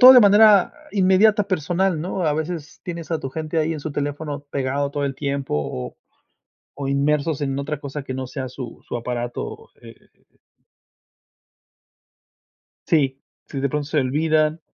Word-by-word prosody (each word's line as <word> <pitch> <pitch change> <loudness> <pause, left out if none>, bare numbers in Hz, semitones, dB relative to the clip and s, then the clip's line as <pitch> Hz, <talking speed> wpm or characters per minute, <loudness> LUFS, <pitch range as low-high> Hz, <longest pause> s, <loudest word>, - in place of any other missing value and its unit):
todo 255 +1 +12
de 250 - +10
manera 205 -2 +6 0.2
inmediata 205 +2 +4
personal, 180 -1 0
¿no? 180 +2 -2
A 150 - +3
veces 155 0 -4
tienes 170 -2 -6
a 160 - 0
tu 135 - -5
gente 160 +1 -3
ahí 155 +1 +1
en 155 - -4
su 155 - -5
teléfono 145 0 -3
pegado 140 +1 -1
todo 145 -1 -2
el 140 -1 -2
tiempo 140 - -2
o 65 -4 -4 0.8
o 140 -1 -4
inmersos 145 +2 +1
en 135 -1 -1
otra 150 +1 -3
cosa 145 0 -5
que 130 -1 -5
no 130 - -3
sea 130 +1 -5
su 125 -2 -8
su - - -4
aparato, 120 0 -5
eh - - -11 3.0
Sí, 135 -4 +2 0.3
si, 140 - -5
de 140 - +1
pronto 150 +1 -2
se 155 +1 0
olvidan. 155 +4 +1
150 Hz, 160 wpm, -22 LUFS, 140-165 Hz, 3.0 s, todo